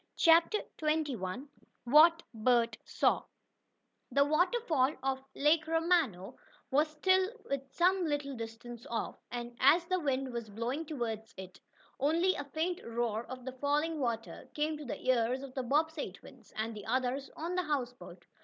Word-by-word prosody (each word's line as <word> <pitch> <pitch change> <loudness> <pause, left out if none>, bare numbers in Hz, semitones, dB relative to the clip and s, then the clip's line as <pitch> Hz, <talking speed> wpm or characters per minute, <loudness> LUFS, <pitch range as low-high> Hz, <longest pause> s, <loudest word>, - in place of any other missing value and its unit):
CHAPTER 335 +6 +5 0.2
XXI 285 -7 -1 0.4
WHAT 315 +6 +6
BERT 230 0 +2
SAW - - +1 0.9
The 280 0 +4
waterfall 310 - +2
of 265 0 -1
Lake 310 +2 +3
Romano 325 - +1 0.3
was 295 +4 +4
still 375 +5 +2 0.4
some 360 +5 +2
little 290 -2 -2
distance 230 +1 -8
off, 230 - -3
and, 240 0 -6
as 330 +6 +5
the 370 +1 0
wind 270 -4 -1
was 235 -2 -5
blowing 245 +9 -3
toward 235 -8 -3 0.2
it, 185 -1 -10 0.4
only 335 +7 +3
a 285 - -5
faint 320 +5 -2
roar 230 -1 -2
of 255 -1 -8
the 260 - -4
falling 295 +4 0
water 230 -4 -3
came 305 +1 0
to 300 - -8
the 245 - -6
ears 255 +1 +2
of 270 -2 -9
the 260 - -2
Bobbsey 300 +4 0
twins, - - -16
and 220 +1 -3
the 210 -1 -9
others 255 +3 -1
on 335 +3 -3
the 365 - +1
houseboat. 245 - -4
275 Hz, 150 wpm, -32 LUFS, 240-320 Hz, 0.9 s, WHAT